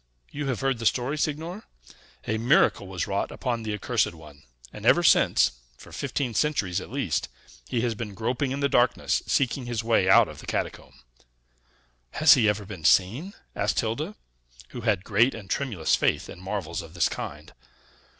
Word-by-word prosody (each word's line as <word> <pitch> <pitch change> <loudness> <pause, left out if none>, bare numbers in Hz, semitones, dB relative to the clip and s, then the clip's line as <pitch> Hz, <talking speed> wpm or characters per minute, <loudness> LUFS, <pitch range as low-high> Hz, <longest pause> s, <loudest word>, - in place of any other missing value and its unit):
You 145 -1 -4
have 130 -5 -2
heard 135 -3 0
the 115 - +1
story, 125 +6 0
signor? 160 +6 -3 0.6
A 110 +1 -1
miracle 115 -4 +3
was 95 -2 -3
wrought 100 -1 -2
upon 120 -3 -3
the 110 -1 -4
accursed 110 -3 0
one; 75 -3 -15 0.3
and, - - -10
ever - - +5
since - - +4 0.3
(for - - -14
fifteen 125 -4 -3
centuries 105 - 0
at - - -10
least), - - -2 0.4
he 120 - 0
has 120 -1 0
been 105 -2 -7
groping 120 +5 -1
in 135 +2 -3
the 140 - +3
darkness, 125 -3 +2
seeking 130 -1 0
his 115 -2 -2
way 110 -5 +2
out - - +7
of - - -10
the - - -12
catacomb." - - -4 1.1
"Has 155 -1 +7
he 115 -5 +4
ever 105 0 -2
been 95 -5 -9
seen?" 120 - +2 0.2
asked 105 +2 0
Hilda, 150 - -2 0.5
who 120 - -7
had 105 -5 +1
great 115 +7 +2
and 105 -4 -10
tremulous 115 - 0
faith - - 0
in 90 - -10
marvels 95 -4 -4
of 85 0 -13
this 85 - +3
kind. 75 +2 -7
115 Hz, 180 wpm, -26 LUFS, 100-135 Hz, 1.1 s, out